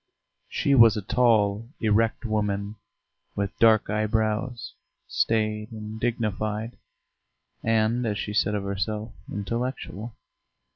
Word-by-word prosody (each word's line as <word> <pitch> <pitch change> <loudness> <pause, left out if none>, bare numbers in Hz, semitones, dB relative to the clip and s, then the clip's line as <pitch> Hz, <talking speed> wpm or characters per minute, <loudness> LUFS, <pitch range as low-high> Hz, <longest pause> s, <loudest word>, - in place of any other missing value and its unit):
She 140 - +1
was 115 -5 +7
a 105 - -3
tall, 110 -1 +2
erect 115 +2 +1
woman 105 -1 -1 0.6
with 100 -1 -2
dark 110 -2 +5
eyebrows, 110 +3 -1 0.3
staid 110 0 0
and 110 0 -7
dignified, 110 -1 -2 0.9
and, 115 +2 +2
as 105 -1 -1
she 105 - -4
said 105 0 +2
of 100 - -2
herself, 105 +3 -3 0.2
intellectual. 115 0 -4
110 Hz, 105 wpm, -26 LUFS, 105-115 Hz, 0.9 s, was